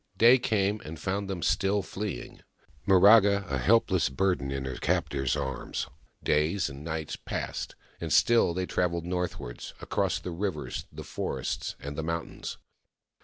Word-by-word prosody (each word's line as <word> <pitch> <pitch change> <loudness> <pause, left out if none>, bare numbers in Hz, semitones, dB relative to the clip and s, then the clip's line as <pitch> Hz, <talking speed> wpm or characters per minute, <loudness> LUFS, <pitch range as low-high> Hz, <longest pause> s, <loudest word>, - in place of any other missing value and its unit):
Day 120 +3 +7
came, 105 -3 +1
and 80 0 -8
found 100 +3 -2
them 90 -4 -3
still 100 +2 +2
fleeing, 100 - -5 0.5
Miraga 100 +1 +6
a 70 - 0
helpless - - +3
burden 90 -1 0
in 70 -1 -3
her 65 -1 -4
captor's 70 -2 0
arms. 65 -1 -3 0.4
Days 80 +5 +2
and 70 +2 -9
nights 80 -1 -3
passed, - - -4 0.2
and - - -4
still 115 -8 +4
they 90 0 0
travelled 85 -2 0
northwards, 90 -9 -4
across - - 0
the 90 - -6
rivers, 85 -3 -3
the - - -8
forest, - - -3
and 70 +1 -6
the 80 - -2
mountains. 85 +1 -4
90 Hz, 145 wpm, -28 LUFS, 75-100 Hz, 0.5 s, Day